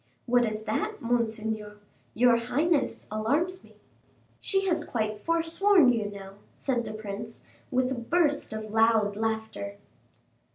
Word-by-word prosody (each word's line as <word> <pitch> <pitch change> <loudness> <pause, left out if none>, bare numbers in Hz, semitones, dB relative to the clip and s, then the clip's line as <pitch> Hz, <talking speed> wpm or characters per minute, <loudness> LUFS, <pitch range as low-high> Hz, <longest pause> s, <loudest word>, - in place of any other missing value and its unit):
"What 245 0 +3
is 215 -1 -3
that, 425 - -2
monseigneur? 220 -3 -2 0.4
Your 245 +1 +5
highness 285 +7 0
alarms 295 +13 0
me." - - -19 0.6
"She 390 -1 0
has 340 -4 +1
quite 215 -5 -2
forsworn 335 -2 +4
you 215 -3 -1
now," 195 -1 -10 0.2
said 245 -4 -1
the - - -5
prince, 215 +1 -6 0.2
with 255 0 +1
a - - +1
burst 290 +4 +1
of 215 -1 -5
loud 220 -2 +3
laughter. 220 -2 -3
230 Hz, 130 wpm, -28 LUFS, 215-295 Hz, 0.6 s, Your